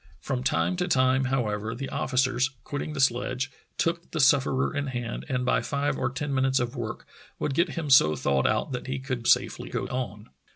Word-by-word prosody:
From 60 Hz, -, -3 dB
time 80 Hz, +7 st, +1 dB
to -, -, 0 dB
time, 130 Hz, 0 st, +3 dB
however, 115 Hz, -4 st, -1 dB
the 135 Hz, +3 st, -4 dB
officers, 130 Hz, 0 st, +1 dB
quitting 145 Hz, +1 st, -4 dB
the 145 Hz, -, -5 dB
sledge, 130 Hz, 0 st, +1 dB, 0.3 s
took 170 Hz, +1 st, -1 dB
the 165 Hz, -, -4 dB
sufferer 135 Hz, 0 st, +3 dB
in 145 Hz, 0 st, -1 dB
hand, 120 Hz, -3 st, -4 dB
and 125 Hz, -2 st, 0 dB
by -, -, +2 dB
five 140 Hz, 0 st, -1 dB
or -, -, -1 dB
ten 140 Hz, +2 st, -3 dB
minutes 130 Hz, 0 st, +2 dB
of 120 Hz, +2 st, -2 dB
work 115 Hz, -4 st, -5 dB, 0.3 s
would 145 Hz, -, -2 dB
get 170 Hz, +3 st, +1 dB
him 155 Hz, -4 st, -2 dB
so 75 Hz, -13 st, +7 dB
thawed 70 Hz, -1 st, +1 dB
out -, -, 0 dB
that 125 Hz, 0 st, -4 dB
he 130 Hz, +1 st, -2 dB
could 130 Hz, -3 st, -4 dB
safely -, -, +2 dB
go -, -, -2 dB
on. 115 Hz, -4 st, -5 dB
130 Hz, 200 wpm, -27 LUFS, 120-135 Hz, 0.3 s, so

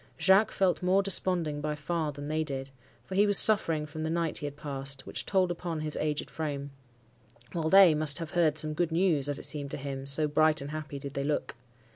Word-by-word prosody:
Jacques 195 Hz, +3 st, +4 dB
felt 190 Hz, -2 st, 0 dB
more 185 Hz, +2 st, +2 dB
desponding 175 Hz, -6 st, 0 dB
by 150 Hz, 0 st, -3 dB
far 155 Hz, +1 st, -3 dB
than 145 Hz, 0 st, -8 dB
they 155 Hz, +1 st, -1 dB
did, 135 Hz, -2 st, -6 dB, 0.3 s
for -, -, -9 dB
he 205 Hz, +2 st, +3 dB
was 205 Hz, -1 st, +6 dB
suffering 165 Hz, -8 st, +4 dB
from 155 Hz, +1 st, -8 dB
the 160 Hz, -, -2 dB
night 165 Hz, -1 st, -1 dB
he 145 Hz, -, -4 dB
had 145 Hz, -, -8 dB
passed, 135 Hz, -2 st, -6 dB
which -, -, -4 dB
told 185 Hz, -2 st, +1 dB
upon 170 Hz, -2 st, -5 dB
his 155 Hz, -1 st, -2 dB
aged 150 Hz, -1 st, -3 dB
frame; 145 Hz, -3 st, -5 dB, 0.8 s
while 160 Hz, -1 st, -2 dB
they 190 Hz, -3 st, +7 dB
must 150 Hz, -2 st, +4 dB
have 165 Hz, -2 st, -6 dB
heard 165 Hz, -4 st, +1 dB
some 155 Hz, 0 st, +1 dB
good 170 Hz, +1 st, -1 dB
news, 165 Hz, -5 st, +1 dB
as 145 Hz, -, -3 dB
it -, -, -4 dB
seemed 145 Hz, -2 st, -4 dB
to -, -, -3 dB
him, 135 Hz, -1 st, -6 dB
so 150 Hz, +2 st, +4 dB
bright 155 Hz, +1 st, +3 dB
and 140 Hz, 0 st, -6 dB
happy 155 Hz, -2 st, -6 dB
did 140 Hz, 0 st, -7 dB
they 140 Hz, -, -3 dB
look. 145 Hz, +1 st, -3 dB
155 Hz, 225 wpm, -28 LUFS, 145-175 Hz, 0.8 s, they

